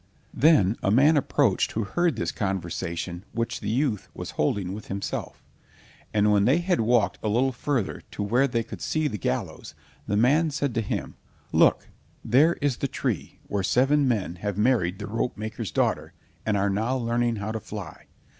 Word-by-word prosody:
Then 130 - +4
a - - +1
man 140 +9 +5
approached 140 -6 +2
who 110 - -1
heard 165 - 0
this 115 - -2
conversation 85 -2 -3
which 115 0 -2
the - - -4
youth 120 -3 0
was - - -6
holding 90 +5 -1
with 105 +1 -8
himself, 100 0 -5 0.7
and 105 0 +3
when 100 -1 +4
they 130 +7 +4
had 175 -4 +1
walked 115 -1 +2
a 110 - -1
little 125 +5 +2
further 130 -4 -2
to - - -4
where 120 +7 +2
they 115 -3 -1
could - - -9
see 155 -1 0
the 105 -8 -4
gallows, - - -3 0.3
the 100 - 0
man 145 +9 +4
said 140 -3 -2
to 115 - 0
him, 105 - -4 0.3
"Look, - - +4 0.4
there 145 +9 +5
is 140 -3 +1
the 140 - -1
tree - - -3
where 100 - -2
seven 135 +8 +3
men 100 -7 -1
have 100 +1 -3
married 105 -6 +2
the 105 - -6
ropemaker's 110 -1 -3
daughter, - - 0 0.3
and 105 -2 +2
are 100 0 +1
now 110 +6 0
learning 120 -1 0
how 105 +1 -4
to 110 - -3
fly. 105 -2 -9
115 Hz, 180 wpm, -26 LUFS, 100-130 Hz, 0.7 s, man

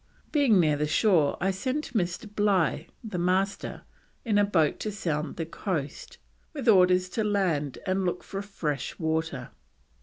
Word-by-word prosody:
Being 270 - +4
near 155 -4 +3
the 150 +1 0
shore 160 -2 +3
I 195 +2 +1
sent 255 +9 -3
Mr. 180 -4 -1
Bligh, 205 -5 +1 0.2
the 210 -6 -4
Master, 190 +3 -1 0.4
in 210 -3 +3
a - - +5
boat 165 -7 +2
to 215 - -3
sound 155 -7 -3
the 165 - -3
coast, 165 -3 -4 0.4
with 275 -5 -5
orders 185 -3 +5
to 215 +5 -1
land 180 -10 0
and 190 +1 0
look 180 - -2
for 195 0 -5
fresh 160 -8 -4
water. 160 -5 -2
185 Hz, 155 wpm, -27 LUFS, 160-205 Hz, 0.4 s, a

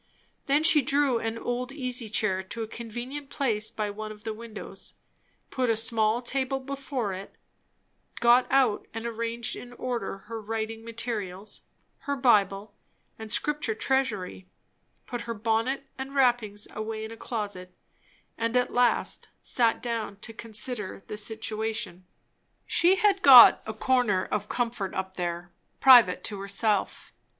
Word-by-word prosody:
Then 285 +3 +3
she 315 -2 +6
drew 275 -2 +2
an 225 0 -3
old 245 +2 -3
easy 250 -5 -3
chair 205 -3 0
to 225 +4 -6
a - - -5
convenient 240 +5 -7
place 220 -7 0
by 210 -1 -3
one 215 +1 -6
of 210 0 -12
the 220 -1 -3
windows; 220 0 -9 0.6
put 255 -2 0
a 225 - +2
small 225 +1 +1
table 270 +2 -1
before 265 -5 -4
it; 190 +2 -9 0.8
got 240 +1 +5
out 260 -6 +2
and 225 +1 -4
arranged 230 0 -3
in 245 0 -10
order 240 -6 -3
her 225 +1 -6
writing 225 +1 -4
materials, 215 -4 -4 0.4
her 285 - -3
Bible 205 -5 +2 0.5
and 220 -1 -7
Scripture 295 -6 0
Treasury; 220 -8 -1 0.6
put 245 -1 -5
her 230 - -2
bonnet 230 +6 0
and 270 +1 -6
wrappings 240 -6 +2
away 220 0 -4
in 220 - -8
a - - -7
closet; 205 -6 -5 0.7
and 230 +2 +1
at 250 - 0
last 245 -1 +1
sat 235 -2 +1
down 230 -4 -3
to 225 - -6
consider 215 -2 -5
the - - -6
situation. 215 -3 -4 0.6
She 355 +3 +4
had 400 -1 +2
got 260 -6 +10
a 220 - -3
corner 220 -5 +2
of 210 0 -3
comfort 230 -5 -2
up 190 0 -4
there, 175 -1 -3 0.3
private 245 -9 +7
to 205 -2 -5
herself. 200 +1 -1
225 Hz, 145 wpm, -27 LUFS, 210-250 Hz, 0.8 s, got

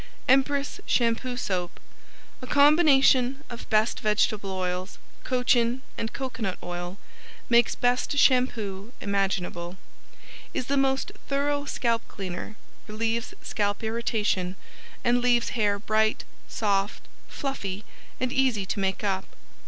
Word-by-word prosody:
Empress 275 +2 +2
Shampoo 245 +1 +1
Soap 180 -7 -2 0.6
A 255 - -7
combination 280 -2 +5
of 235 - -8
best 215 +1 +2
vegetable 210 -1 +1
oils, 185 0 -3 0.3
cochin 250 0 +2
and 225 - -3
coconut 230 -8 -3
oil, 175 +1 -5 0.5
makes 235 -1 +4
best 245 +3 +1
shampoo 235 -6 +2
imaginable. 190 -3 -2 0.8
Is 255 - -1
the 280 - 0
most 270 -1 +1 0.2
thorough 285 +1 0
scalp 235 -4 0
cleaner, 190 +1 -6 0.3
relieves 225 +2 -2
scalp 205 +1 -1
irritation 220 -5 0 0.5
and 245 0 +3
leaves 240 -1 +3
hair 205 -4 +1
bright, 215 +1 +1 0.2
soft, 200 -1 -1 0.2
fluffy 210 -8 -4 0.3
and 255 0 -1
easy 260 -7 +2
to 200 - -3
make 190 +1 -1
up. 195 -2 0
230 Hz, 115 wpm, -26 LUFS, 200-255 Hz, 0.8 s, combination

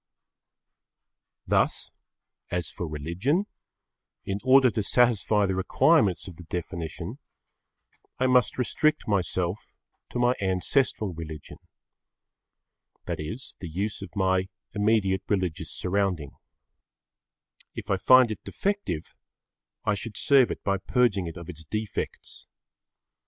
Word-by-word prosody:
Thus, - - +1 0.6
as 90 -1 -2
for 85 - -5
religion, 85 - -1 0.8
in 100 +1 -2
order 130 -1 +6
to 110 - -1
satisfy 110 -2 +3
the 95 -1 -1
requirements 95 -1 +3
of 90 -4 -10
the 90 - -10
definition, 85 -1 -5 1.0
I 130 - +1
must 125 -1 +3
restrict 155 +5 +1
myself 95 -2 0 0.5
to - - -5
my 120 0 +3
ancestral 95 +2 +1
religion. 80 -2 -8 1.5
That - - -3
is 110 +12 -6
the 90 - -6
use 100 +7 -3
of 100 - -7
my 95 -1 +1 0.2
immediate 105 -3 +2
religious 90 -5 -1
surrounding. 90 -6 -1 1.4
If - - -5
I 95 - +3
find 130 +4 +6
it 110 - -6
defective, 195 - -3 0.7
I 105 - +3
should 105 +1 -5
serve 135 -3 +5
it - - -5
by 100 -1 +1
purging 100 -3 +1
it 80 - -7
of 85 -1 -9
its 80 -2 -8
defects. 105 +7 -5
100 Hz, 115 wpm, -27 LUFS, 90-115 Hz, 1.5 s, order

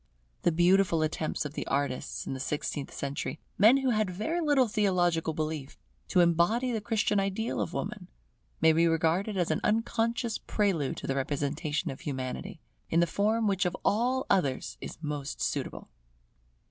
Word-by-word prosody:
The 175 - +3
beautiful 175 0 +3
attempts 155 0 -2
of 145 - -5
the - - -4
artists 140 -2 -2
of - - -3
the 130 - -5
sixteenth 145 +1 -3
century, 140 +3 -4 0.2
men 220 +7 +7
who 265 -2 +1
had 215 -3 +1
very 220 - -2
little 290 -5 +3
theological 180 -6 +1
belief, 155 -3 -4 0.3
to 180 - +4
embody 175 +9 +3
the 225 -2 -1
Christian 210 -2 +1
ideal 195 - -1
of 100 - -2
Woman, - - -4 0.5
may 160 - +6
be 165 +1 +4
regarded 165 +5 +1
as 175 -3 +1
an 155 - 0
unconscious 230 +1 0
prelude 185 -10 0
to - - -6
the 135 - 0
representation 145 +3 -2
of 135 - -9
Humanity, 130 -3 -4 0.3
in 165 - +3
the 170 - +5
form 215 +5 +1
which 195 -3 +2
of 180 0 -1
all 250 +5 +2
others 145 -10 0
is - - -7
most 145 -2 -4
suitable. - - -3
175 Hz, 165 wpm, -29 LUFS, 150-215 Hz, 0.5 s, men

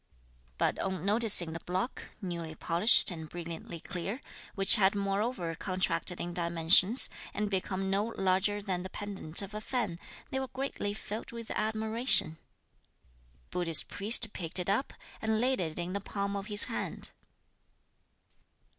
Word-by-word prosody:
But - - -1
on 190 -1 -4
noticing 205 -6 +4
the 165 - -6
block 185 +9 -4 0.2
newly 170 -3 -6
polished 175 +7 +6
and 160 -3 -8
brilliantly 170 0 -8
clear, 195 +8 -6 0.4
which 195 -1 +7
had 195 -1 +2
moreover 200 -2 -2
contracted 180 0 -2
in 175 0 -5
dimensions, 170 +6 +5 0.3
and 210 0 -2
become 190 0 -2
no 200 +2 0
larger 195 +2 0
than 185 -3 -3
the 185 - -7
pendant 195 -4 -3
of 200 +2 -10
a 215 - -6
fan, 215 -9 -3 0.3
they 265 - -2
were 265 - -4
greatly 260 -6 -5
filled 215 +1 -7
with 230 -1 -9
admiration. 220 -5 +1 1.0
The - - -35
Buddhist 165 -3 +3
priest 215 +2 +1
picked 165 -1 -4
it 180 +1 -1
up, 225 +8 -1 0.3
and 220 0 -1
laid 255 +2 0
it 160 -3 -5
in 175 +1 -4
the 200 - -3
palm 200 0 -4
of 200 0 -6
his 205 -1 +6
hand. - - -5
195 Hz, 150 wpm, -30 LUFS, 175-215 Hz, 1.0 s, which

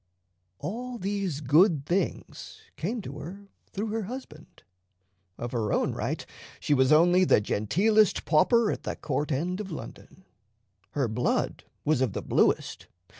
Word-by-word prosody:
All 245 - -5
these 195 -6 -2
good 150 +1 +4
things 180 +3 -3
came 215 +6 -3
to 140 -1 -7
her 180 +8 -8 0.3
through 215 +3 -3
her 220 -1 -2
husband. 195 - -10 0.7
Of 120 0 -5
her 110 -4 -1
own - - +1
right - - -3 0.3
she - - +1
was 130 -1 +3
only 175 +4 +5
the 180 - +5
genteelest 190 - +2
pauper 215 +8 +4
at - - -4
the - - -4
court 150 0 -2
end 175 +7 -1
of 200 - -7
London. 185 +2 -10 0.7
Her 135 -4 +1
blood 115 +3 -1 0.2
was 150 -3 +2
of 125 -7 +1
the - - -4
bluest. - - +1
170 Hz, 145 wpm, -27 LUFS, 140-205 Hz, 0.7 s, only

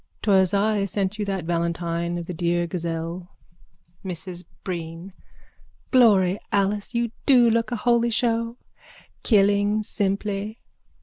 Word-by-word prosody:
_ - - -47
'Twas 190 -3 +4
I 205 0 +1
sent 200 +1 -2
you 210 - -1
that 195 -4 -3
valentine 170 0 -1
of 170 - -5
the 180 - -5
dear 175 0 0
gazelle. 170 +1 -4 0.7
MRS 180 -1 -5 0.2
BREEN: 170 +1 -6 0.8
Glory 205 -7 +5
Alice, 205 +3 0
you 235 -1 0 0.2
do 250 -3 +6
look 230 +2 0
a - - 0
holy 235 +1 +2
show! 230 0 0 0.6
Killing 205 0 +3
simply. 205 +1 -2
195 Hz, 125 wpm, -24 LUFS, 175-215 Hz, 0.8 s, do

